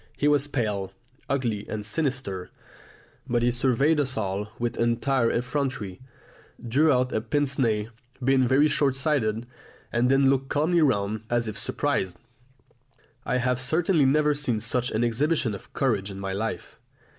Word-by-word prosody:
He 145 - +1
was 145 -1 +3
pale, 105 -8 -2 0.4
ugly, 120 -7 -1
and 105 -1 -4
sinister; 125 - -2 0.8
but 120 -1 +1
he 120 - +3
surveyed 135 +5 +2
us 130 -4 -1
all 100 0 -2
with 120 0 -2
entire 120 +1 +2
effrontery, 125 -6 -2 0.7
drew 150 +7 +4
out 125 -1 +1
a 110 - 0
pince 140 +5 0
nez, 110 -4 +1 0.4
being 130 0 +3
very 135 +4 +4
short 140 -3 +1
sighted, 125 -6 0 0.5
and 120 +1 +2
then 135 0 +4
looked 135 0 +1
calmly 165 +4 +2
round 105 -7 +1
as 120 -1 0
if 110 - -4
surprised. 90 -2 -1 1.1
I 125 - +1
have 125 0 0
certainly 160 +3 +2
never 150 +2 +3
seen 130 -6 -1
such 125 +3 0
an 110 +2 0
exhibition 120 +1 +1
of 100 - -10
courage 105 -7 0
in 95 -1 -7
my 95 -1 -3
life. 110 +3 -4
125 Hz, 155 wpm, -26 LUFS, 110-140 Hz, 1.1 s, drew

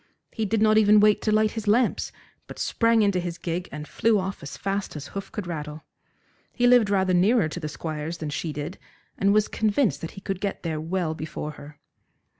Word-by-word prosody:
He 220 - -2
did 215 +1 +1
not 215 0 +5
even 210 0 +6
wait 210 0 +4
to 215 - 0
light 215 0 +3
his 220 -2 -6
lamps, 230 +3 +2 0.4
but - - -10
sprang 230 -1 +2
into 200 -3 +2
his 175 -1 -4
gig 170 +2 -4
and 150 0 -7
flew 225 -1 +2
off 190 -1 -3
as 145 - -8
fast 195 -2 -3
as 145 -1 -7
hoof 195 0 -7
could 210 - -5
rattle. 155 -2 -6 0.7
He 245 - 0
lived 245 -4 +5
rather 190 -2 +2
nearer 195 +2 +4
to 160 - -6
the 155 -2 -4
Squire's 155 +1 -5
than 155 -3 -5
she 155 +3 -3
did, 150 +5 -6 0.4
and 195 +1 +3
was 210 +1 +3
convinced 220 +2 +1
that 165 - -4
he - - -7
could 195 -1 -4
get 200 -1 -3
there 160 -2 -2
well 170 0 -1
before 155 -1 -5
her. 145 0 -12
190 Hz, 215 wpm, -25 LUFS, 160-215 Hz, 0.7 s, even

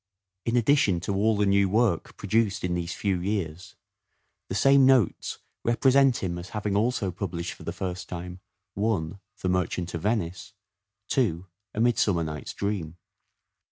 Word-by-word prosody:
In 115 +1 +2
addition 120 -7 +3
to 100 - -2
all 105 +2 +2
the 105 - +2
new 100 0 +3
work 110 -4 +1
produced 105 0 0
in 90 -1 0
these 85 0 -3
few 95 -3 0
years 90 -2 -3 0.7
the 95 - -3
same 135 +4 +5
Notes 130 -7 +3 0.3
represent 130 +1 +3
him 85 -2 -2
as 90 +2 -9
having 105 -1 -1
also 105 -3 +1
published 90 -2 -4
for - - -17
the - - -4
first 90 -1 -5
time: 90 +1 -6 0.2
— 95 0 -57
1. 100 -4 -1 0.2
The 90 - 0
Merchant 90 -1 -1
of 85 - -3
Venice. 95 -3 -2 0.6
2. 95 -10 +1 0.3
A - - -2
Midsummer 110 -7 +2
Night's 75 -2 -5
Dream. 95 -5 -3
100 Hz, 160 wpm, -27 LUFS, 90-110 Hz, 0.7 s, same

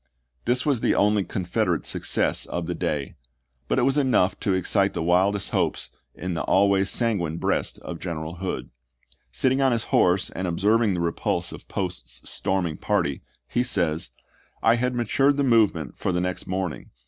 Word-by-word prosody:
l - - -47 0.2
This 125 +3 +1
was 140 -5 +2
the - - +2
only 105 0 +3
Confed 90 -2 -5
erate - - 0
success - - 0
of 85 -1 -3
the 90 - -2
day; 75 -4 -2 0.5
but - - 0
it - - +3
was 135 +3 +3
enough 120 -9 +2
to 95 - +1
excite 100 +2 +2
the - - -1
wildest 95 +4 +2
hopes - - -1 0.2
in 90 0 -4
the 85 - -2
always 100 0 +3
sanguine 95 -9 0
breast - - -1
of 85 -2 -6
General 80 -1 -5
Hood. 95 +1 -4 0.6
Sitting 130 - +1
on 135 -1 +4
his 115 -2 0
horse 90 +1 +3
and 95 - -3
observing 105 +4 +2
the 85 - -2
repulse 85 -1 -1
of - - -11
Post's - - -5
storming 90 -5 -1
party, 70 -1 0 0.3
he 120 - 0
says, 85 - +1 0.3
" - - -34
I 115 +1 +5
had 125 +1 0
matured 135 +4 +2
the 140 - +2
movement 110 - +2
for - - -2
the 90 - 0
next 90 0 -2
morning. 95 -3 -3
95 Hz, 185 wpm, -25 LUFS, 85-115 Hz, 0.6 s, I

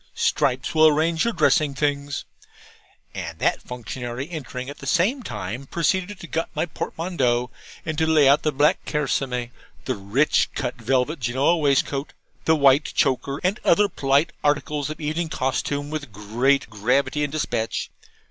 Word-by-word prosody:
Stripes 125 +5 +1
will 155 0 +6
arrange 160 +3 +2
your 235 - 0
dressing 150 -5 +3
things;' 145 -1 -1 0.9
and - - -6
that - - +1
functionary, 125 +1 -6
entering 130 -5 -6
at 140 +1 -8
the 140 - -8
same 195 - +2
time, 115 - -6
proceeded 185 +5 -1
to - - -8
gut 165 0 -2
my - - +1
portmanteau, 135 -8 -1 0.3
and 155 0 -2
to 160 - +2
lay 155 -3 +5
out 140 +2 +5
the 155 - +1
black 145 +2 +2
kerseymeres, 130 -4 -1 0.3
'the 130 - -1
rich 105 +9 +2
cut 125 - -2
velvet 130 +6 +1
Genoa 130 +7 +2
waistcoat,' 140 -2 0 0.3
the 160 - +4
white 140 0 +5
choker, 135 0 +1
and 185 +3 +1
other 205 +4 +4
polite 140 -1 +1
articles 145 0 0
of 155 - -6
evening 160 +2 -2
costume, 145 +2 -2
with 145 -5 -5
great 120 +8 +1
gravity 125 +7 0
and 145 - -2
despatch. 120 -7 -2
145 Hz, 155 wpm, -23 LUFS, 130-155 Hz, 0.9 s, will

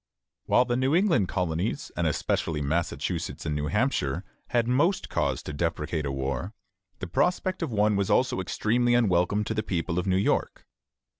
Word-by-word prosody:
While 125 - +4
the 120 0 0
New 130 +4 +2
England 170 - +3
colonies, 90 +3 -2
and - - 0
especially 80 -2 -1
Massachusetts 80 +2 -2
and 75 - -1
New 75 0 -2
Hampshire, 105 - 0 0.2
had 120 -1 +1
most 155 +10 +1
cause - - -1
to 75 - -6
deprecate 80 -1 -2
a - - -2
war, 70 - -3 0.4
the - - -5
prospect 180 - 0
of 160 -6 -2
one 105 -1 +2
was 100 -1 0
also - - +2
extremely 120 +2 +1
unwelcome 100 -2 +2
to 110 - -3
the 110 - 0
people 90 -3 -2
of 90 - -3
New 95 -1 +3
York. 95 - 0
95 Hz, 170 wpm, -27 LUFS, 80-120 Hz, 0.4 s, While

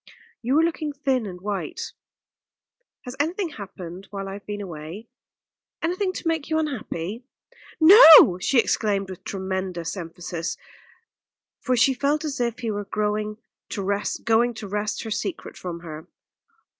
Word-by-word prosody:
"You 255 +5 +1
are 320 - +5
looking 315 -3 -1
thin 270 -5 0
and 180 -2 -8
white. 205 0 -4 1.1
Has 250 +1 -8
anything 340 +5 0
happened 190 - -9
while 195 -1 -5
I 195 - -5
have 200 0 -10
been 205 0 -4
away, 180 +3 -8 0.7
anything 370 +3 0
to 355 - -5
make 320 -3 -1
you 315 - +1
unhappy?" 235 - -3 0.6
"No!" 320 - +10
she 260 - +1
exclaimed 200 -4 +1
with 185 - -10
tremendous 190 -3 -3
emphasis, 170 -1 -5 1.0
for 255 -1 0
she 260 +3 +5
felt 285 +4 0
as 290 -3 -3
if 235 -1 -1
he 230 -2 -1
were 205 0 -4
going 210 +1 -2 0.3
to 200 - -4
wrest 200 +1 -2 0.8
her 220 - -6
secret 330 - -4
from 170 -2 -6
her. 160 -1 -9
210 Hz, 140 wpm, -24 LUFS, 190-285 Hz, 1.1 s, No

